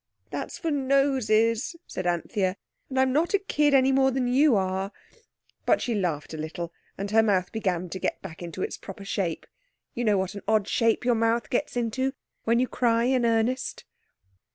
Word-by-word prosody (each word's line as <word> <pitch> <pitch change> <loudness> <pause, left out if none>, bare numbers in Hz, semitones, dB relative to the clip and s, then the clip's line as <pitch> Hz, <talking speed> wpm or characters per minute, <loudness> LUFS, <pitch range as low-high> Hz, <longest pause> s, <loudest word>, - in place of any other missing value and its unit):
"That's - - -4
for 335 -1 -2
noses," 265 -3 +2
said 185 - -4
Anthea, 185 +2 0 0.3
"and 260 -1 -1
I'm 260 -1 +3
not 330 +7 +2
a - - +6
kid 295 -7 +2
any 265 0 +5
more 265 0 +4
than 260 -1 0
you 270 +1 +4
are," 190 0 -1 0.8
but - - +4
she 240 - -1
laughed 170 -8 -2
a - - -5
little, 165 +2 -5 0.2
and 200 +1 -4
her 225 +1 +6
mouth 190 -4 +1
began 185 -5 -1
to 190 - -5
get - - -2
back 160 - -9
into 175 +2 -5
its - - -4
proper 195 +1 -9
shape. 180 -5 -2 0.5
You 240 - -2
know 210 -3 +3
what 190 0 -1
an 200 - -7
odd 215 -2 +2
shape 230 +1 +1
your 245 - +4
mouth 230 +1 +1
gets 245 0 -1
into 260 +3 0 0.3
when 230 +1 +3
you 255 +1 +2
cry 230 -2 +2
in 250 -1 +2
earnest. 230 +3 0
230 Hz, 190 wpm, -26 LUFS, 190-260 Hz, 0.8 s, a